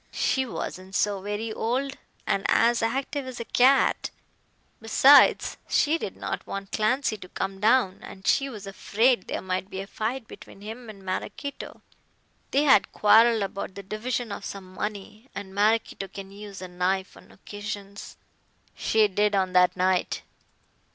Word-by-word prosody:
"She 265 -1 0
wasn't 185 0 -6
so 205 -2 +1
very 210 +3 -3
old, 265 +6 -1 0.3
and 195 - 0
as 235 0 +4
active 265 +4 -2
as 255 -2 -7
a 235 - -4
cat. 265 +4 +3 0.7
Besides, 265 +6 +6
she 315 +3 +2
did - - -5
not - - -5
want 195 0 -6
Clancy 220 +1 +1
to 185 -2 -12
come 195 0 -4
down, 215 -2 +3
as 190 - -11
she 275 0 +2
was 210 -6 -8
afraid 210 +2 +1
there - - -4
might 185 0 -3
be 190 - -6
a 195 - -4
fight 225 +4 -4
between 195 - -13
him 225 +3 -8
and 200 -3 -11
Maraquito. 205 +9 -5 0.7
They 280 - +2
had 280 -2 +5
quarrelled 220 +1 +5
about 195 -1 -5
the 200 - -7
division 225 +3 -3
of 200 - -6
some 190 -2 -8
money, 210 +4 -6
and 200 -1 -7
Maraquito 210 -1 +1
can 195 0 -9
use 200 -1 -9
a - - -5
knife 185 +2 -1
on - - -17
occasions." 205 0 -8 0.6
"She 220 -1 +3
did 205 +1 +1
on 190 -1 0
that 180 -1 +4
night." 185 0 +1
210 Hz, 160 wpm, -26 LUFS, 195-235 Hz, 0.7 s, Besides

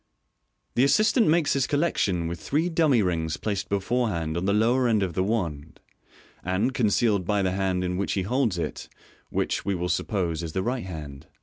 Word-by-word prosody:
The 125 - +3
assistant 215 - +4
makes 160 -1 +3
his 135 -2 +1
collection 100 - 0
with 85 0 -5
three 155 - 0
dummy 155 -9 +3
rings 80 -3 -1
placed 100 -3 -3
beforehand 100 -6 -1
on 85 +2 -2
the 100 - +2
lower 120 +5 +3
end 110 -4 +2
of 90 -3 -2
the 95 - 0
wand, 85 -8 -3 0.6
and 95 +8 0
concealed 105 -3 +2
by 100 +2 0
the 95 - +1
hand 95 -1 0
in 90 0 -2
which 95 -5 -1
he 95 - 0
holds 115 -2 0
it; 80 -4 -4 0.4
which, - - -1
we 100 0 -1
will 90 0 -2
suppose, 85 -2 -1
is 80 -2 -5
the 95 - -1
right 120 +1 -2
hand. 75 -6 -8
95 Hz, 190 wpm, -26 LUFS, 85-120 Hz, 0.6 s, assistant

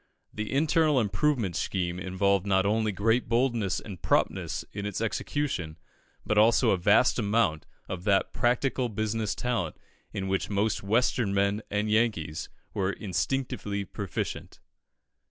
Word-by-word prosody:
The 110 0 -4
internal 155 0 +3
improvement 110 - 0
scheme 90 -2 -2
involved 95 +1 +1
not 95 -1 +3
only 110 +1 +1
great 115 +5 +1
boldness 115 -5 +1
and 95 -5 -9
promptness - - 0
in 100 0 -4
its 105 - -3
execution, 115 - -2 0.5
but 105 - +2
also 110 +1 +5
a 95 - +3
vast 105 +8 +4
amount 100 -7 +1 0.2
of 90 -2 -5
that 100 -2 +2
practical 125 +1 +1
business 110 0 -2
talent 115 -10 -2 0.3
in 95 -1 -3
which 95 0 -1
most 105 +1 0
"Western 110 0 +1
men" 100 +2 +1
and 105 +1 0
Yankees 105 -9 0 0.3
are 95 -1 +1
instinctively 105 -1 -2
proficient. 95 -2 -5
105 Hz, 135 wpm, -28 LUFS, 95-115 Hz, 0.5 s, also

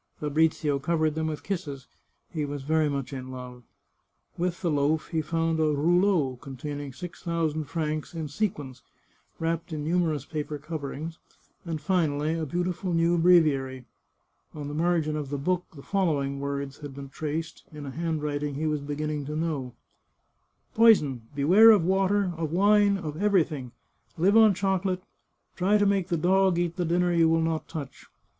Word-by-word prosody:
Fabrizio 150 -1 +1
covered 155 +1 +1
them 160 0 -2
with 155 -1 -4
kisses; 150 -9 -4 0.5
he 155 -3 -1
was 145 -1 -4
very 155 +1 +2
much 140 -1 -3
in 130 -1 -6
love. 125 -1 -8 0.7
With 175 0 -2
the 170 - +1
loaf 150 +2 +1
he 160 -2 0
found 165 +1 -1
a - - +3
" - - +3
rouleau," 170 -4 +2
con 135 -2 -9
taining 145 0 -6
six 180 +2 -8
thousand 160 -3 -1
francs 155 +1 -3
in 160 -2 -3
sequins, 145 - -3 0.6
wrapped 165 0 -2
in 150 -2 -4
numer 170 0 +2
ous 140 -2 -6
paper 150 -1 -4
coverings, 155 +1 -6 0.5
and 165 -2 -3
finally 155 -2 0
a 165 -2 -2
beautiful 175 +3 -2
new 165 +1 +3
breviary. 140 -7 +3 0.7
On 145 -2 -5
the 145 - -5
margin 160 -1 +1
of 150 -3 -4
the 145 - -2
book 180 +5 -1
the 140 - -11
following 145 -8 0
words 140 0 -4
had 145 -3 -8
been 140 0 -8
traced, 155 +3 -4
in 150 -2 -8
a 135 - -5
handwriting 150 -3 -2
he 155 +3 -2
was 150 -2 0
beginning 145 0 -3
to 150 - -4
know: 150 -6 -3 0.5
" - - -45
Poison! 150 - +4
Beware 185 +11 +7
of 205 -7 +6
water, 190 0 +2
of 160 -2 -3
wine, 200 +2 +4
of 160 -2 -5
everything! 160 - +1 0.5
Live 190 +6 +3
on 220 -3 +7
chocolate; 190 -1 0 0.5
try 195 +3 +3
to 205 - +2
make 195 -3 +2
the 170 - 0
dog 185 +2 +3
eat 175 -1 -1
the 180 - -1
dinner 175 +1 +2
you 165 -1 +4
will 165 0 +3
not 160 -1 -2
touch. 145 -5 -8
160 Hz, 175 wpm, -27 LUFS, 145-175 Hz, 0.7 s, Beware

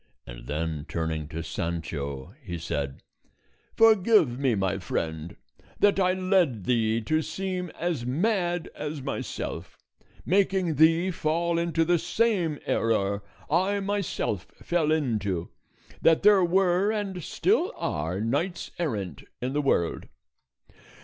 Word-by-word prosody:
And - - -10
then 80 +1 -3
turning 80 -2 -2
to 80 +1 -5
Sancho, 80 -3 -4
he 90 -9 -5
said, 75 -5 -4 0.7
"Forgive 215 - +5
me, 130 -5 +2
my 95 -2 0
friend, 80 +1 -3 0.4
that 205 -1 +4
I 185 -1 +3
led 185 - +1
thee 115 0 +1
to 155 +7 +1
seem 180 +2 -3
as 170 -8 -1
mad 175 - 0
as 150 -2 -5
myself, 140 - -5 0.5
making 190 -2 +2
thee 165 +4 +4
fall 170 +1 0
into 165 -1 +1
the 175 0 +3
same 185 -8 +1
error 100 -3 +1 0.3
I 190 +5 +2
myself 195 - -2 0.2
fell 165 -3 +1
into, 105 - -1 0.5
that 165 -1 +4
there 205 -2 +6
were 185 +2 +3
and 200 -4 -3
still - - +1
are 80 +5 -2
knights 145 - -1
errant 100 - -3 0.2
in 130 +2 -3
the 150 - +1
world." 85 - 0
155 Hz, 125 wpm, -27 LUFS, -, 0.7 s, there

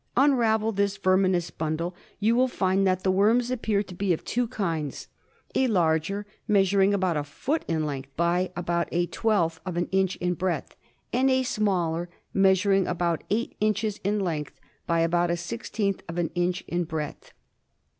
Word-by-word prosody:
Unravel 230 -5 +3
this 200 -1 0
verminous 185 -3 +2
bundle. 160 +3 -2 0.3
You 220 +3 +3
will 255 +1 +4
find 195 -4 +1
that 185 0 +1
the 190 - +3
worms 225 +6 +3
appear 220 -5 0
to 185 - -11
be 185 0 +1
of 160 - -4
two 245 0 0
kinds 165 - -3 0.2
— - - -35
a 265 - +2
larger, 180 0 +1 0.2
measuring 195 -1 +4
about 185 -5 +1
a 145 - -1
foot 270 - -2
in 160 -2 0
length 135 -2 -4
by 175 +2 +1
about 170 -1 -1
a 175 +1 +1
twelfth 175 -5 0
of 185 -3 -4
an 175 - 0
inch 190 -1 +2
in 180 0 -1
breadth, 180 -4 -2 0.4
and 260 +2 +3
a 260 0 +3
smaller, 180 -7 0 0.3
measur 195 0 +4
ing 195 -1 +2
about 170 -2 -1
eight 230 +4 -1
inches 215 0 0
in 205 +2 +1
length 160 -6 -3 0.3
by 170 -1 +2
about 170 +1 +2
a 170 - 0
sixteenth 200 +1 -3
of/ 165 - -5
an 170 -2 0
inch 175 +1 0
in 175 +1 -1
breadth. 160 -3 -5
185 Hz, 175 wpm, -26 LUFS, 170-210 Hz, 0.4 s, will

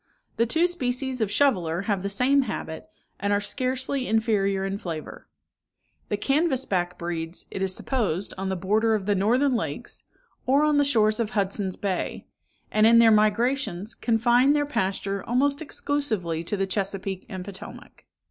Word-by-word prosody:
The 230 +1 +2
two 325 +8 +2
species 260 -6 -1
of 215 - +1
shoveler 185 - +2
have 200 -2 -1
the 200 - -2
same 250 +7 +3
habit, 160 -5 -5 0.3
and 200 +1 -1
are 205 - +3
scarcely 255 +4 -2
inferior 205 -3 +1
in 195 +1 -3
flavour. 165 -5 -7 0.8
The 205 - 0
canvass 275 +2 +1
back 180 -2 -1
breeds, 170 0 -4
it 190 - -5
is 190 -1 +1
supposed, 205 - -1
on 190 0 -3
the 190 - -1
borders 215 +4 +1
of 190 - -10
the 205 - +2
northern 245 +8 +2
lakes, - - -3 0.4
or 275 +3 +4
on 300 -1 +3
the 285 - +4
shores 215 -5 +3
of 225 -3 0
Hudson's 195 -2 -1
Bay; 195 -3 -3 0.5
and 215 +1 +4
in 230 0 +6
their 230 -1 +7
migrations 215 -1 +1
confine 240 +4 +3
their 295 -1 +1
pasture 195 -6 -2
almost 280 +5 +1
exclusively 220 - -2
to 205 - -2
the 195 - +1
Chesapeake 195 -1 -3
and 185 -3 -6
Potomac. 195 -2 -11
215 Hz, 165 wpm, -25 LUFS, 195-255 Hz, 0.8 s, their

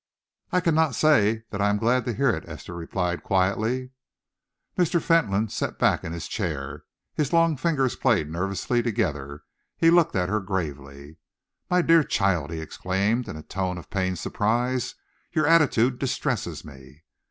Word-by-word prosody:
"I 180 - +2
cannot 160 -5 +2
say 110 -8 +3
that 100 - -3
I 100 - +3
am 105 - +1
glad 120 +3 +1
to 120 - -1
hear 140 +5 +2
it," 80 - -4
Esther 80 +2 -8
replied 85 +1 -3
quietly. 110 +7 0 0.8
Mr. 175 -1 +2
Fentolin 115 - +2
sat - - -3
back - - +2
in 80 - -5
his 85 -1 -5
chair. 75 -8 -4 0.3
His 150 -3 -1
long 165 -1 +3
fingers 135 -4 0
played 75 - +2
nervously 95 +8 -1
together, 75 - -2 0.3
he 165 - +5
looked 170 -7 +4
at 90 -2 +1
her 105 +3 0
gravely. 75 -5 -5 0.5
"My 180 0 +3
dear 165 -1 +5
child," 95 - 0
he 80 -1 -5
exclaimed, 100 +8 -1
in - - -6
a 80 - -9
tone 95 0 -3
of 85 - -11
pained 95 -2 -1
surprise, 120 +7 -1 0.4
"your 155 - +2
attitude 135 -6 +3
distresses 125 - -2
me!" 70 +1 -14
105 Hz, 160 wpm, -25 LUFS, 85-130 Hz, 0.8 s, he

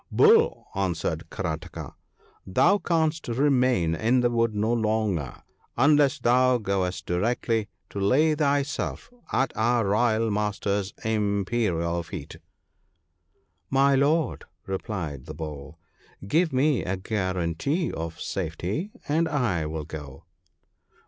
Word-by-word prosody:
" - - -48
' - - -41
Bull,' 450 +1 +4
answered - - -2
Karataka, - - -5 0.3
' 435 0 -31
thou 200 +1 +5
canst 160 -2 0
remain 125 - +2
in 120 +8 +2
the 120 0 +2
wood 115 -2 +1
no 110 +3 +1
longer 110 - -1 0.3
unless 145 +1 +4
thou 125 +1 +3
goest 95 -4 -2
directly 110 +3 0 0.2
to 100 - -4
lay 140 +11 +3
thyself 145 - -1 0.2
at 130 -1 0
our 115 +1 +2
Royal 110 +2 +2
master's 105 -1 -1
imperial 100 -5 0
feet.' 80 -3 -8 1.3
'My 135 +1 +4
Lord,' 145 +4 +1 0.2
replied 90 - -4
the 75 - -7
Bull, 75 -1 -7 0.5
'give 160 - +2
me 135 +1 +2
a 95 +1 -2
guarantee 95 - -1
of 80 +1 -5
safety, 95 - -3 0.2
and 160 +3 +1
I 110 - 0
will 80 -1 -4
go.' 75 -4 -9
110 Hz, 120 wpm, -26 LUFS, 90-135 Hz, 1.3 s, thou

